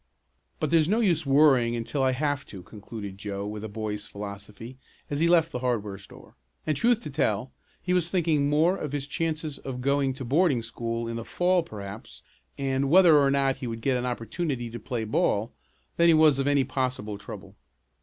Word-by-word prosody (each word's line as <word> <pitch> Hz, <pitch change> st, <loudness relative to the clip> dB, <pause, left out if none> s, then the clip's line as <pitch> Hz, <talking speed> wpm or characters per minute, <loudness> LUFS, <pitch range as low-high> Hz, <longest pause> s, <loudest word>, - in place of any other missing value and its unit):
"But -, -, -1 dB
there's 165 Hz, -1 st, +4 dB
no 215 Hz, +3 st, +2 dB
use 170 Hz, -9 st, +1 dB
worrying 135 Hz, -4 st, +4 dB
until 120 Hz, +4 st, -2 dB
I 130 Hz, 0 st, +3 dB
have 145 Hz, 0 st, -1 dB
to," 95 Hz, -3 st, -10 dB
concluded 100 Hz, -1 st, -9 dB
Joe 100 Hz, -1 st, -4 dB
with 105 Hz, 0 st, -6 dB
a 110 Hz, -, -5 dB
boy's 105 Hz, -1 st, -4 dB
philosophy 105 Hz, +4 st, -8 dB, 0.3 s
as 145 Hz, -, -1 dB
he 165 Hz, -, +3 dB
left 165 Hz, -1 st, +4 dB
the 125 Hz, -, -3 dB
hardware 105 Hz, -6 st, -2 dB
store, 95 Hz, -, -15 dB, 0.3 s
and 155 Hz, -, 0 dB
truth 235 Hz, -, +2 dB
to 150 Hz, -, -7 dB
tell, 125 Hz, -4 st, 0 dB, 0.3 s
he 180 Hz, -, 0 dB
was 175 Hz, -2 st, +1 dB
thinking 160 Hz, -6 st, +1 dB
more 160 Hz, +5 st, +3 dB
of 150 Hz, -6 st, -5 dB
his 140 Hz, -2 st, -2 dB
chances 155 Hz, -1 st, -3 dB
of 130 Hz, -2 st, -6 dB
going 140 Hz, +1 st, +1 dB
to 130 Hz, 0 st, -7 dB
boarding 140 Hz, -2 st, +2 dB
school 115 Hz, 0 st, -4 dB
in 115 Hz, 0 st, -4 dB
the 115 Hz, -, -5 dB
fall 180 Hz, +7 st, +1 dB
perhaps, 105 Hz, -8 st, -9 dB, 0.3 s
and 135 Hz, 0 st, 0 dB
whether 170 Hz, -2 st, +7 dB
or 140 Hz, -1 st, +4 dB
not 135 Hz, -1 st, +1 dB
he 130 Hz, -2 st, -5 dB
would 115 Hz, -1 st, -5 dB
get 130 Hz, +2 st, +1 dB
an 125 Hz, 0 st, -1 dB
opportunity 120 Hz, -, -3 dB
to 120 Hz, -, -6 dB
play 115 Hz, +1 st, -3 dB
ball, 110 Hz, 0 st, 0 dB, 0.4 s
than 170 Hz, -, +5 dB
he 165 Hz, -, +6 dB
was 155 Hz, -3 st, +5 dB
of 135 Hz, -, 0 dB
any 145 Hz, -1 st, +3 dB
possible 125 Hz, -6 st, -3 dB
trouble. -, -, -10 dB
135 Hz, 200 wpm, -26 LUFS, 115-155 Hz, 0.4 s, whether